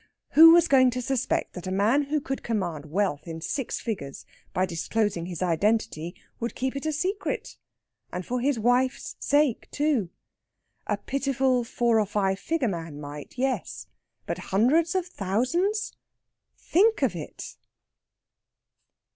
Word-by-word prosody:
Who 325 +2 +10
was 340 0 +6
going 260 -3 +5
to - - -1
suspect 260 +1 -1
that 180 0 -7
a - - -2
man 220 +10 +2
who 300 +2 0
could 270 -2 -4
command 175 -10 -3
wealth 180 -2 -1
in 165 -1 -5
six 235 - -3
figures 140 - -5 0.3
by 185 0 +1
disclosing 180 +1 -1
his 180 0 -4
identity, 175 -2 0 0.2
would 235 0 -3
keep 260 +1 -2
it 275 +3 -3
a - - +1
secret? 370 +7 -2 0.6
And 180 0 -5
for 250 0 -2
his 275 0 +1
wife's 245 +3 +1
sake 285 -4 +1
too! 285 - 0 0.8
A - - 0
pitiful 270 -2 0
four 235 -1 +1
or 210 - +1
five 195 -1 0
figure 320 -6 0
man 165 -6 -5
might 145 - -9
yes. 180 - -2 0.4
But - - -3
hundreds 295 - +3
of 370 -2 +1
thousands! 345 - -1 0.6
think 435 +6 +2
of - - +1
it! - - -8
235 Hz, 145 wpm, -26 LUFS, 185-280 Hz, 0.8 s, Who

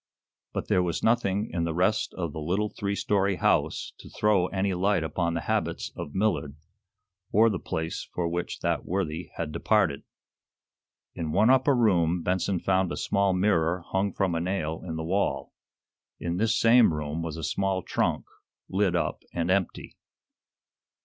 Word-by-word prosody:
But - - -4
there 90 - +3
was 85 -2 -2
nothing 110 -2 +1
in 85 -1 0
the 85 -1 -2
rest 95 +5 +1
of 85 -5 -3
the - - -5
little 95 +7 -1
three 100 0 -3
story 100 -1 +1
house - - +1
to - - -12
throw 105 -4 +2
any 95 0 -1
light 95 0 +1
upon 85 +1 -1
the 85 - -1
habits - - -2
of 70 - -7
Millard, 95 -8 0 0.8
or 110 +2 +5
the 95 - -2
place 80 0 -4
for 85 -1 -1
which 85 +1 -3
that - - 0
worthy 90 -2 -3
had 80 -2 -3
departed. 85 -4 +1 1.1
In 80 -2 -4
one 110 +9 +4
upper 130 +1 +4
room 90 -7 +2
Benson 95 0 0
found 95 -1 +1
a - - -3
small 100 -1 +1
mirror 90 -3 +1
hung 95 +1 +1
from 95 -1 0
a 85 - -1
nail 85 -3 -2
in 80 -3 -5
the 80 - -3
wall. 95 +5 -1 0.7
In 85 0 -2
this 110 +2 +2
same 115 -7 +5
room 75 +2 -3
was 80 -1 -4
a 80 - -6
small 95 +4 -1
trunk, - - -1 0.4
lid 95 -2 +1
up 85 - -1
and 85 +1 0
empty. 95 -2 -1
90 Hz, 170 wpm, -27 LUFS, 85-100 Hz, 1.1 s, or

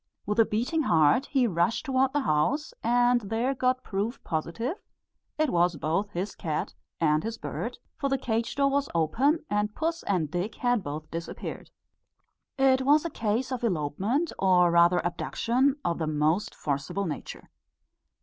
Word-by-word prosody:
With 210 +2 -1
a 225 - +7
beating 245 +11 0
heart 165 - +3
he 265 -4 +2
rushed 180 - 0
towards 265 -1 +1
the 290 - +1
house, 250 - 0
and 245 +1 +3
there 225 +6 -1
got 255 0 0
proof 210 +5 -3
positive 225 - -3 0.6
it 310 -2 +1
was 175 0 +2
both 160 +8 -1
his 195 +1 -4
cat 155 -2 -3 0.3
and 155 -1 +2
his 225 +1 -4
bird; 240 +1 -5 0.2
for 275 - -1
the 270 - +1
cage 230 -3 -2
door 275 0 +2
was 280 0 0
open, 265 - +2
and 210 0 -1
puss 330 +1 -1
and 170 -7 -1
Dick 180 +6 -2
had 245 -3 +1
both 155 0 -6
disappeared. 165 0 -6 0.9
It 265 -1 +4
was 295 +4 +4
a 335 - -2
case 230 +4 -1
of 250 -2 -3
elopement, 200 - 0
or 180 -2 +4
rather 170 +1 +4
abduction 250 +9 +1
of 170 0 0
the 160 - -1
most 155 +5 0
forcible 155 +8 -2
nature. 155 - -7
220 Hz, 160 wpm, -27 LUFS, 170-260 Hz, 0.9 s, a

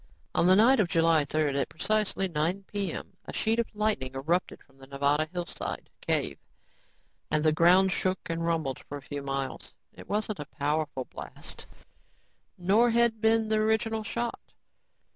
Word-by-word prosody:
On 175 - +3
the 185 - +7
night 240 +6 +6
of 200 - +3
July 165 -3 +3
3rd, 150 -1 0
at - - -3
precisely 210 +1 0
9:00 175 +4 -1
p.m., 200 -4 -4
a - - -7
sheet 225 +1 +1
of 235 - +1
light 210 -5 +1
erupted 135 +7 -2
from 135 -1 -27
the 135 - -13
Nevada 140 +3 +1
hillside 175 -1 -5
cave - - -1 0.9
and 155 0 +1
the 155 - +4
ground 180 +4 +5
shook 185 0 -1
and 165 0 -2
rumbled 160 -6 -1
for 145 - -8
a - - -10
few 145 0 -5
miles. 135 -1 -4 0.2
It - - -13
wasn't 210 0 -1
a 150 - -4
powerful 145 -2 -2
blast, - - -9 0.9
nor 200 +7 +4
had 235 -1 +2
been 225 0 +3
the 215 0 +2
original 220 0 +1
shot. 235 +2 -3
175 Hz, 160 wpm, -28 LUFS, 150-215 Hz, 0.9 s, the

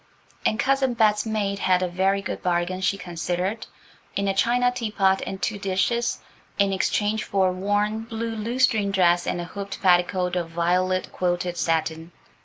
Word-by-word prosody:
And 215 - 0
Cousin 265 -2 +2
Bet's 215 -1 +2
maid 200 -2 -1
had 185 -1 +2
a - - +1
very 190 +3 0
good - - -4
bargain, 180 +1 -1
she 195 +1 +1
considered, 180 +3 -3 0.5
in 200 0 0
a 195 - +2
china 245 +5 +2
teapot 210 -6 +1
and 190 - -5
two 210 0 -2
dishes, 205 +5 0 0.4
in 200 -1 +2
exchange 210 +3 0
for 190 -2 +1
a - - -2
worn, 205 +3 -1
blue 230 0 -4
lutestring 225 -1 +1
dress 175 -3 +3
and - - -1
a - - -3
hooped 200 +3 -7
petticoat 180 0 +2
of 170 -2 -2
violet 180 +2 0
quilted 175 0 -1
satin. 165 0 -1
195 Hz, 165 wpm, -24 LUFS, 180-215 Hz, 0.5 s, dress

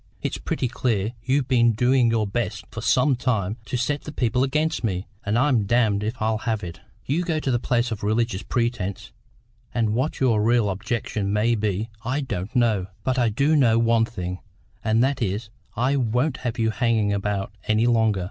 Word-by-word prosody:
It's - - -2
pretty 130 - -2
clear 115 -3 -1
you've 130 +1 +1
been 120 -3 +4
doing 125 +2 +3
your 115 -2 +1
best 105 0 -3
for 115 - -6
some 130 +3 +3
time 110 -5 -1
to 125 - -2
set 140 +4 -1
the 150 - -8
people 125 -3 +1
against 155 +3 0
me, 95 -3 -1 0.2
and 105 +2 0
I'm 125 -6 +2
damned 110 -3 +2
if 115 +3 -3
I'll 110 0 0
have 110 -2 -2
it! 85 -2 -7 0.3
You 150 +6 0
go 165 -3 -1
to 135 - -1
the 120 - +1
place 120 0 0
on 110 - -3
religious 110 -1 0
pretences, 115 -6 -2 0.6
and 110 -3 +1
what 130 +7 -1
your 115 -5 +3
real 115 -1 +3
object 105 +5 -3
may 105 +3 +1
be 105 0 -1
I 130 +5 -1
don't 105 -5 -4
know; 110 -6 +2 0.2
but 130 0 0
I 120 -2 +3
do 140 +8 +2
know 120 -6 +4
one 115 -1 +3
thing, 90 -5 -5 0.4
and 110 +2 +3
that 135 0 0
is, 105 +1 -2 0.2
I 130 +4 +1
won't 125 +3 0
have 120 -3 -4
you 110 -1 +1
hanging 110 -3 +1
about 100 0 -2
any 110 +2 +3
longer. 110 -4 +3
115 Hz, 195 wpm, -24 LUFS, 105-125 Hz, 0.6 s, been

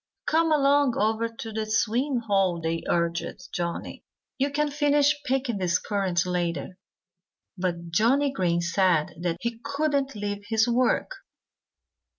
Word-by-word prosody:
"Come 325 0 +2
along 280 -3 +3
over 220 +2 +1
to 225 0 -8
the 215 0 -3
swimming 235 +5 +1
hole!" 195 -4 +2
they 165 0 -2
urged 170 +1 -1
Johnnie. 170 -2 -4 0.4
"You 275 +2 +2
can 295 +1 0
finish 290 0 +2
picking 255 -5 -1
these 180 -1 +2
currants 190 -4 -1
later." 180 +1 -2 0.8
But 170 -2 -3
Johnnie 260 - +3
Green 175 -6 +1
said 170 -2 +2
that 175 -1 -1
he 235 -1 -3
couldn't 280 -2 -1
leave 205 -1 -3
his 220 0 +3
work. 250 - +1
220 Hz, 135 wpm, -26 LUFS, 180-275 Hz, 0.8 s, along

